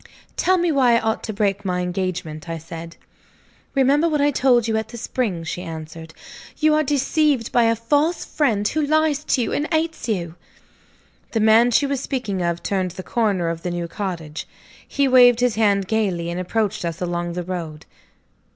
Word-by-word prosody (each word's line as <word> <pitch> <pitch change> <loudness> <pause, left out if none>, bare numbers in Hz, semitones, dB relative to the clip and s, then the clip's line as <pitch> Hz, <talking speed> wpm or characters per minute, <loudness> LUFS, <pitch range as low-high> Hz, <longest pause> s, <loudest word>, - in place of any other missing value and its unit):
"Tell 370 +1 +2
me 345 -1 +1
why 255 -5 +4
I - - +4
ought 220 0 -1
to 220 - -3
break 205 -1 -1
my 180 -2 -1
engagement," 180 -4 -4
I 165 - -3
said. 165 +1 -9 0.8
"Remember 280 +5 +3
what 300 -2 0
I 290 +1 +3
told 250 -4 +3
you 220 - 0
at 220 0 -1
the 235 - -9
spring," 220 -7 -2
she 165 +2 -4
answered. 160 -1 -8 0.4
"You 310 0 +3
are 305 - +3
deceived 285 -3 +1
by 240 -1 +4
a 230 0 +3
false 290 +9 0
friend 220 -9 0
who 310 - -1
lies 305 0 +1
to 250 - +1
you - - -3
and 295 - -2
hates 320 -4 -1
you." 170 -6 -2 1.0
The 225 - +1
man 220 +2 +5
she 245 +4 +3
was 280 -1 -1
speaking 245 -9 -3
of 170 0 -2
turned 190 -2 -1
the 185 +2 -8
corner 200 -8 0
of 165 0 -4
the 180 - -3
new 175 -1 -3
cottage. 170 -5 -5 0.4
He 280 -1 +1
waved 245 -2 +6
his 245 -2 +2
hand 200 -3 +2
gaily, 185 -6 -1
and 175 - -4
approached 210 +2 -1
us 170 0 -4
along 175 -1 -3
the 180 0 -3
road. 165 -4 -6
215 Hz, 190 wpm, -21 LUFS, 175-265 Hz, 1.0 s, waved